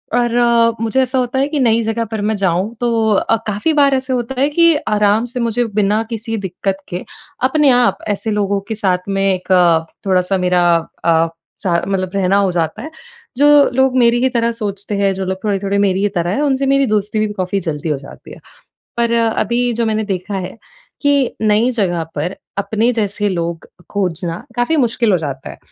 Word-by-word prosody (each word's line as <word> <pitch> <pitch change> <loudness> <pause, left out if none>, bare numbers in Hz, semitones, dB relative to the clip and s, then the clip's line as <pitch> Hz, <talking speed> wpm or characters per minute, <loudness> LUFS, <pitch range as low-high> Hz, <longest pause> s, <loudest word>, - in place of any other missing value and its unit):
और 240 -1 +1
अ, 235 -1 +4
मुझे 230 +4 +1
ऐसा 260 0 -1
होता 250 +1 -1
है 275 - +2
कि 295 0 -2
नई 230 -3 +3
जगह 225 +1 -1
पर 220 -2 -3
मैं 215 +1 0
जाऊँ 190 +2 0
तो 230 -2 +1
अ, 200 - +2
काफ़ी 210 +10 0
बार 285 -2 +4
ऐसा 260 0 -2
होता 250 +1 -3
है 280 - +4
कि 335 +1 +4
आराम 210 +1 +2
से 250 - -3
मुझे 235 +1 0
बिना 210 +1 +2
किसी 225 0 -4
दिक्कत 190 0 -3
के, 175 +1 -4 0.4
अपने 285 +2 +3
आप 245 -1 +3
ऐसे 210 +2 -2
लोगों 200 -1 0
के 220 - -2
साथ 185 -3 -1
में 195 0 0
एक 185 +1 -5
अ, 170 -3 +4 0.2
थोड़ा-सा 185 0 +1
मेरा 180 -1 +2 0.4
अ, 165 -1 +3 0.4
स - - -2 0.2
मतलब 185 -2 -2
रहना 195 0 +2
हो 200 -2 +2
जाता 165 -3 -2
है। 310 - -8 0.5
जो 285 - +4 0.3
लोग 265 0 +2
मेरी 240 -1 +4
ही 260 - +3
तरह 235 -2 0
सोचते 205 -2 -4
हैं, 195 -1 +2
जो 190 0 -4
लोग 190 0 -4
थोड़े-थोड़े 200 -1 -1
मेरी 195 -1 +1
ही 205 - +2
तरह 175 0 0
हैं, 215 - -1
उनसे 275 -2 +1
मेरी 275 0 +3
दोस्ती 210 0 0
भी 215 - +1
काफ़ी 190 0 -2
जल्दी 160 -3 -4
हो 150 - 0
जाती 135 +1 -13
है। - - -12 0.6
पर 235 0 +1
अ, 230 -1 +2
अभी 240 +3 0
जो 230 0 0
मैंने 220 0 0
देखा 195 0 -4
है 185 +3 -6 0.5
कि 285 -3 +2
नई 215 +3 +3
जगह 180 -7 0
पर 170 +6 -3 0.2
अपने 220 +4 +1
जैसे 210 -2 -1
लोग 170 -3 -3 0.2
खोजना 175 -4 -2 0.2
काफ़ी 245 +7 +1
मुश्किल 235 -5 +1
हो - - +4
जाता 140 -4 -5
है। - - -11
210 Hz, 205 wpm, -17 LUFS, 190-240 Hz, 0.6 s, अ